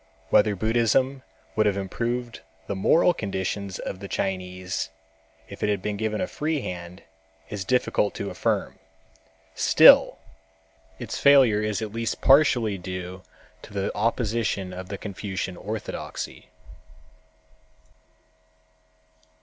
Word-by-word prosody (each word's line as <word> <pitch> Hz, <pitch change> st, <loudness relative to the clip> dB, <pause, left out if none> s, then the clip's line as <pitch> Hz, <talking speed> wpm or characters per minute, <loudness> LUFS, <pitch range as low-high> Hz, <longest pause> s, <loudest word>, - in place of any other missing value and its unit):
Whether 105 Hz, -1 st, +4 dB
Buddhism 120 Hz, +6 st, +1 dB, 0.3 s
would 110 Hz, -1 st, +3 dB
have 100 Hz, -1 st, +1 dB
improved 120 Hz, +5 st, -3 dB, 0.2 s
the 100 Hz, -, -3 dB
moral 165 Hz, -, +4 dB
conditions 100 Hz, -, -3 dB
of 95 Hz, -, -6 dB
the 100 Hz, -, -7 dB
Chinese; 95 Hz, -2 st, -3 dB, 0.6 s
if -, -, -11 dB
it 105 Hz, -, +1 dB
had 100 Hz, -2 st, +1 dB
been 105 Hz, -1 st, -2 dB
given 110 Hz, +1 st, -2 dB
a -, -, 0 dB
free 155 Hz, -3 st, -2 dB
hand, 90 Hz, -1 st, -7 dB, 0.5 s
is 105 Hz, -2 st, -3 dB
difficult 115 Hz, -2 st, +1 dB
to -, -, -4 dB
affirm. -, -, -2 dB, 0.7 s
Still -, -, +6 dB, 0.8 s
its -, -, -5 dB
failure 130 Hz, -7 st, +6 dB
is 105 Hz, 0 st, -1 dB
at 105 Hz, -1 st, -6 dB
least 115 Hz, 0 st, -2 dB
partly 125 Hz, -8 st, +4 dB
due 90 Hz, 0 st, -6 dB, 0.4 s
to 105 Hz, -, -13 dB
the 100 Hz, -1 st, -2 dB
opposition 110 Hz, -4 st, -1 dB
of 90 Hz, 0 st, -7 dB
Confucian 100 Hz, -2 st, -5 dB
orthodoxy. 105 Hz, +3 st, -6 dB
105 Hz, 115 wpm, -25 LUFS, 95-115 Hz, 0.8 s, Still